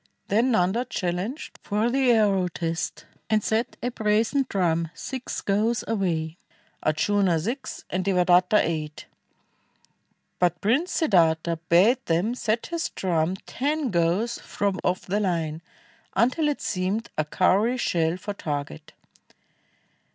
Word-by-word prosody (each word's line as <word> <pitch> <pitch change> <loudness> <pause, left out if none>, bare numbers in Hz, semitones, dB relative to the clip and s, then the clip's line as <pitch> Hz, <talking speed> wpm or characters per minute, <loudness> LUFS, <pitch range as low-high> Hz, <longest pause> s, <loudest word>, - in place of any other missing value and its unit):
Then 230 +6 +3
Nanda 220 +1 +2
challenged 185 - -4
for 215 +3 0
the 265 0 +2
arrow 200 -5 +3
test 165 -1 -4 0.2
And 215 -1 +2
set 225 +2 -1
a 245 - -1
brazen 225 +5 +1
drum 170 -4 0
six 260 -2 -5
gows 215 +4 +1
away, 175 -6 -1 0.4
Ardjuna 175 +3 +2
six 235 - -5
and 185 +1 -2
Devadatta 180 +1 +4
eight; 155 -2 -4 1.3
But 175 -1 +2
Prince 265 - +1
Siddartha 170 - +2
bade 220 +10 +5
them 175 +8 +1
set 230 -2 -1
his 335 -1 -3
drum 175 -1 0
Ten 290 0 -1
gows 175 +7 +1
from 200 -2 -2
off 180 0 -1
the 200 +3 0
Hne, 165 -5 -1 0.5
until 255 +7 +2
it 290 - -3
seemed 195 +4 -2
A 155 - +1
cowry 195 +9 +2
shell 165 -7 0
for 205 +2 -5
target. 145 - -5
195 Hz, 125 wpm, -25 LUFS, 170-230 Hz, 1.3 s, bade